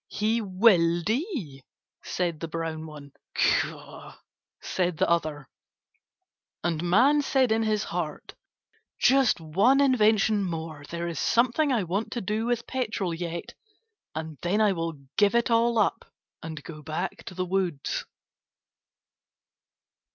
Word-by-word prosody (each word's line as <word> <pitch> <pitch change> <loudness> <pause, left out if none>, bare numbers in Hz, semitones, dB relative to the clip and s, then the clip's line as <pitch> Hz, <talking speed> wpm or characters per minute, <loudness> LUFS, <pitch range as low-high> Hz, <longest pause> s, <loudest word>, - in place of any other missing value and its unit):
"He 220 +2 0
will 185 -4 +3
die," 220 - -3 0.4
said 170 -4 -2
the 165 - -4
brown 160 -1 -4
one. 145 -2 -11 0.2
"Caw," - - -1 0.4
said 180 -3 -1
the - - +2
other. 155 -4 -1 1.2
And 165 -2 0
Man 245 +12 +4
said 265 -4 +2
in 225 +1 +2
his 215 -1 +1
heart: 165 -4 -5 0.6
"Just 265 -5 +4
one 195 - +3
invention 220 -6 +3
more. 160 -4 -5
There 170 0 -3
is 170 - -4
something 255 +5 +2
I 235 -6 +1
want 195 +6 -2
to 240 - -3
do 215 +4 -2
with 240 -1 -1
petrol 215 -8 -2
yet, 170 0 -5 0.6
and 160 -2 -6
then 185 +5 +1
I 215 -2 +4
will 165 -2 -2 0.2
give 205 +2 +4
it 235 0 +2
all 230 0 +3
up 210 - 0 0.3
and 155 -2 -7
go 155 -2 -9
back 160 +5 -4
to 185 - -8
the 185 0 -1
woods." 180 -6 -1
185 Hz, 135 wpm, -27 LUFS, 165-230 Hz, 1.2 s, Man